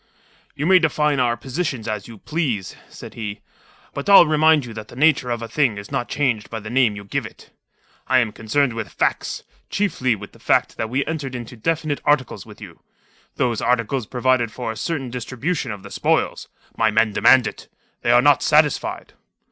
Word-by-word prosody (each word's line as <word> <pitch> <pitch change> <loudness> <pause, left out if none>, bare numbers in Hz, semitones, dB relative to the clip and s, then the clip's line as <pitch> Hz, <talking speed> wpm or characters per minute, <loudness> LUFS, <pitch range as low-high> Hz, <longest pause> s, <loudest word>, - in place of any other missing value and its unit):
"You 145 +1 -3
may 185 +1 +6
define 150 -3 +1
our 120 -2 +1
positions 130 -2 -4
as 105 -2 -4
you 115 -2 -11
please," 125 - -3
said - - -11
he. 105 -3 -6 0.5
"But 140 +7 -4
I'll 195 -3 +9
remind 155 -2 +4
you 115 - -9
that 110 -1 -8
the - - -14
nature 140 -2 +3
of 120 -1 -2
a - - -5
thing 125 -5 +1
is 100 +4 -9
not 135 -3 -2
changed 125 -7 -1
by 115 - -5
the 110 +1 -8
name 125 -5 +3
you 100 - -8
give 100 - -3
it. - - -13 0.6
I 130 - +3
am 120 -4 +2
concerned 120 +5 0
with 115 -2 -5
facts; - - -1 0.3
chiefly 130 - 0
with 100 0 -10
the - - -19
fact - - +1
that 110 - -3
we 135 +4 0
entered 145 -5 -4
into 120 0 -7
definite 155 +4 -2
articles 145 -4 0
with - - -13
you. - - -12 0.6
Those 120 -3 0
articles 125 0 0
provide 125 -2 +1
for 120 -1 -4
a - - -8
certain 135 -3 -3
distribution 130 +4 -3
of 100 -2 -8
the - - -11
spoil. - - +1 0.4
My 110 - +2
men 110 0 +2
demand 130 +3 +5
it. - - -6 0.3
They - - -1
are 120 +1 +5
not 145 -1 +5
satisfied." 150 -2 +1
125 Hz, 195 wpm, -21 LUFS, 115-145 Hz, 0.6 s, I'll